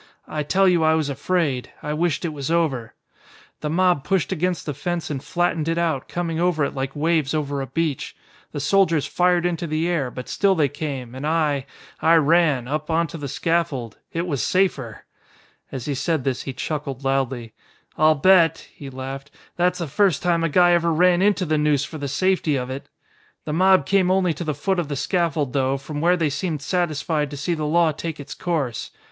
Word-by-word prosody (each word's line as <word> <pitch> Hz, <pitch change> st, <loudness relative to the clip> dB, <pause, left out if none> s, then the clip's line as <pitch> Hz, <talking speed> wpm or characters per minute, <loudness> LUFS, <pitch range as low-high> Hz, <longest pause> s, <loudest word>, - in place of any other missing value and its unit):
I 155 Hz, -, -3 dB
tell 190 Hz, +6 st, +2 dB
you 175 Hz, -3 st, +3 dB
I 160 Hz, 0 st, +4 dB
was 155 Hz, -3 st, 0 dB
afraid. 140 Hz, -2 st, -1 dB
I 150 Hz, -, -2 dB
wished 170 Hz, +2 st, 0 dB
it -, -, 0 dB
was 140 Hz, -1 st, -4 dB
over. 140 Hz, -9 st, 0 dB, 0.6 s
"The 150 Hz, -, -3 dB
mob 175 Hz, -3 st, +2 dB
pushed 185 Hz, +3 st, 0 dB
against 180 Hz, 0 st, -1 dB
the 150 Hz, -, -3 dB
fence 175 Hz, +3 st, -3 dB
and 135 Hz, -3 st, -4 dB
flattened 175 Hz, -3 st, 0 dB
it 165 Hz, 0 st, 0 dB
out, 165 Hz, -6 st, 0 dB
coming 165 Hz, -2 st, -3 dB
over 170 Hz, -4 st, +2 dB
it -, -, -4 dB
like 135 Hz, +1 st, -4 dB
waves 155 Hz, -1 st, +1 dB
over 145 Hz, -2 st, -2 dB
a 135 Hz, -, -4 dB
beach. 160 Hz, 0 st, -2 dB, 0.4 s
The -, -, -4 dB
soldiers 165 Hz, 0 st, +2 dB
fired 180 Hz, -1 st, +2 dB
into 170 Hz, -1 st, -1 dB
the 155 Hz, +2 st, -1 dB
air, 160 Hz, -7 st, 0 dB
but 125 Hz, +1 st, -8 dB
still 195 Hz, -1 st, +2 dB
they 150 Hz, -5 st, +2 dB
came, 135 Hz, -4 st, -5 dB
and 135 Hz, +3 st, -4 dB
I, 150 Hz, -4 st, 0 dB, 0.3 s
I 165 Hz, +1 st, +5 dB
ran 155 Hz, -5 st, +3 dB
up, 150 Hz, +3 st, -3 dB
onto 165 Hz, 0 st, 0 dB
the 145 Hz, -, -4 dB
scaffold. 155 Hz, -, -1 dB
It 170 Hz, +1 st, -2 dB
was 145 Hz, -8 st, -2 dB
safer!" 140 Hz, -, 0 dB, 0.7 s
As 130 Hz, -3 st, -5 dB
he 145 Hz, -, -1 dB
said 150 Hz, +1 st, -1 dB
this 130 Hz, -2 st, -1 dB
he 135 Hz, -, -5 dB
chuckled 140 Hz, -1 st, -4 dB
loudly. 130 Hz, -4 st, -1 dB, 0.4 s
"I'll 155 Hz, 0 st, +4 dB
bet," 165 Hz, +1 st, +4 dB
he 140 Hz, -, -9 dB
laughed, 135 Hz, +2 st, -7 dB, 0.3 s
"that's 180 Hz, 0 st, +1 dB
the 170 Hz, -, -3 dB
first 175 Hz, +2 st, +2 dB
time 170 Hz, -2 st, +2 dB
a 165 Hz, -, +1 dB
guy 175 Hz, +3 st, +5 dB
ever 170 Hz, -1 st, +3 dB
ran 175 Hz, +2 st, +4 dB
into 200 Hz, -1 st, +2 dB
the 155 Hz, -1 st, +1 dB
noose 150 Hz, -2 st, +2 dB
for 155 Hz, -, -8 dB
the 140 Hz, -, -3 dB
safety 175 Hz, +1 st, +1 dB
of 125 Hz, -1 st, -3 dB
it! 135 Hz, +1 st, -7 dB, 0.6 s
The 150 Hz, -, -3 dB
mob 185 Hz, -1 st, +4 dB
came 190 Hz, +1 st, +2 dB
only 185 Hz, -2 st, +2 dB
to 155 Hz, -, -5 dB
the 155 Hz, -3 st, -2 dB
foot 190 Hz, +6 st, 0 dB
of 170 Hz, -, -2 dB
the 145 Hz, -, -3 dB
scaffold 155 Hz, -4 st, 0 dB
though, 135 Hz, -1 st, +1 dB
from 145 Hz, +2 st, -6 dB
where 175 Hz, +2 st, +3 dB
they 160 Hz, -4 st, 0 dB
seemed 150 Hz, 0 st, -3 dB
satisfied 155 Hz, -3 st, -1 dB
to 145 Hz, -, -7 dB
see 155 Hz, +5 st, -1 dB
the 155 Hz, -2 st, -2 dB
law 165 Hz, +1 st, +3 dB
take 160 Hz, +1 st, -6 dB
its 145 Hz, -, -7 dB
course. 150 Hz, -10 st, -2 dB
155 Hz, 205 wpm, -22 LUFS, 140-175 Hz, 0.7 s, I